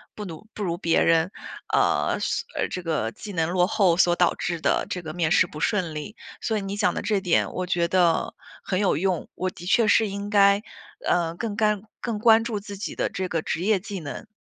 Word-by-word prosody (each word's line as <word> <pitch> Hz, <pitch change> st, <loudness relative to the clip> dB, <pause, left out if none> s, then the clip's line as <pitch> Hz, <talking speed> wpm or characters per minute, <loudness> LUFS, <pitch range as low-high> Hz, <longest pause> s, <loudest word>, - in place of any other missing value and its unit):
不 210 Hz, -, -6 dB
奴 180 Hz, +4 st, -9 dB
不 210 Hz, -, -5 dB
如 170 Hz, -3 st, -1 dB
别 165 Hz, -2 st, +2 dB
人， 165 Hz, +2 st, +3 dB, 0.4 s
呃， -, -, +2 dB
所 -, -, -1 dB, 0.2 s
这 180 Hz, -, -5 dB
个 155 Hz, -10 st, -1 dB
技 210 Hz, -, -9 dB
能 165 Hz, -3 st, 0 dB
落 180 Hz, 0 st, +3 dB
后 195 Hz, -5 st, +3 dB
所 175 Hz, -1 st, +4 dB
导 175 Hz, -1 st, +2 dB
致 170 Hz, -1 st, -3 dB
的 -, -, +1 dB
这 180 Hz, -, -3 dB
个 160 Hz, -2 st, -7 dB
面 165 Hz, -2 st, 0 dB
试 -, -, +5 dB
不 150 Hz, -, -9 dB
顺 175 Hz, -3 st, 0 dB
利。 150 Hz, +9 st, -6 dB, 0.3 s
所 220 Hz, -, 0 dB
以 205 Hz, -, -2 dB
你 195 Hz, +1 st, -4 dB
讲 210 Hz, 0 st, +2 dB
的 -, -, -3 dB
这 210 Hz, -3 st, +1 dB
点 180 Hz, -3 st, +1 dB
我 185 Hz, -, -2 dB
觉 175 Hz, -2 st, +1 dB
得 175 Hz, -2 st, +2 dB, 0.3 s
很 185 Hz, -, -1 dB
有 200 Hz, -7 st, +2 dB
用， 185 Hz, 0 st, -1 dB
我 185 Hz, +1 st, -1 dB
的 175 Hz, -1 st, -11 dB
确 215 Hz, +4 st, +3 dB
是 220 Hz, -, +4 dB
应 200 Hz, +1 st, -5 dB
该， 200 Hz, 0 st, +5 dB, 0.5 s
呃， 170 Hz, -2 st, +1 dB
更 215 Hz, +2 st, -4 dB
干 210 Hz, -1 st, +1 dB, 0.2 s
更 230 Hz, -3 st, -3 dB
关 225 Hz, 0 st, +6 dB
注 225 Hz, -3 st, -3 dB
自 200 Hz, 0 st, -9 dB
己 205 Hz, -, -5 dB
的 -, -, -1 dB
这 185 Hz, -, -3 dB
个 165 Hz, -3 st, -1 dB
职 160 Hz, -, -3 dB
业 205 Hz, +1 st, +2 dB
技 195 Hz, 0 st, -6 dB
能。 155 Hz, +8 st, -7 dB
185 Hz, 245 characters per minute, -25 LUFS, 170-205 Hz, 0.5 s, 关